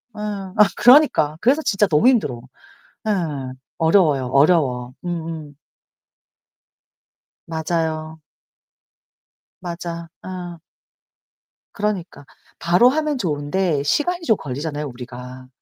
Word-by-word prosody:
예. - - -9
아 200 -3 -5 0.2
그러니까. 245 - +5
그래서 275 +6 +3
진짜 210 -7 +2
너무 155 +7 +3
힘들어. 215 - +2 0.7
예. - - +1 0.7
어려워요, 160 -6 +3
어려워. 130 -3 +2
음음. 165 -4 -5 1.9
맞아요. 160 -1 -3 1.4
맞아. 170 -1 -6 0.2
음. 180 -2 -7 1.2
그러니까. 200 -8 -3 0.3
바로 180 +9 +5
하면 300 0 -1
좋은데 150 - -1
시간이 345 - 0
좀 220 - +4
걸리잖아요 145 +2 -4
우리가. 125 0 -10
165 Hz, 210 characters per minute, -21 LUFS, 145-200 Hz, 1.9 s, 그러니까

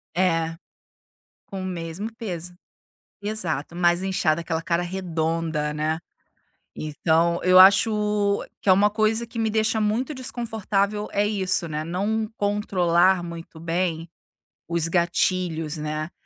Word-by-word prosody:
É, 165 -3 +1 0.9
com 195 -1 -6
o - - -4
mesmo 175 +3 -4
peso. 180 -6 -6 0.7
Exato, 175 -7 -2
mais 175 +1 +2
inchada, 170 -4 +1
aquela 165 -1 -3
cara 170 +1 0
redonda, 165 -4 -2
né. 155 +1 -1 0.8
Então 160 +2 +1
eu 185 0 +6
acho 205 +1 +5 0.2
que - - -4
é - - +9
uma 205 +2 +4
coisa 220 +2 +1
que 230 0 -9
me 220 -1 +1
deixa 220 +1 +1
muito 230 +8 0
desconfortável 215 -5 -2
é 205 +1 +2
isso, 190 -4 0
né, 155 0 -3
não 210 +6 -1
controlar 190 -3 +2
muito 170 -1 -9
bem 165 0 -2 0.6
os 170 -1 0
gatilhos, 170 -2 0
né. 155 +2 -3
180 Hz, 125 wpm, -24 LUFS, 165-210 Hz, 0.9 s, é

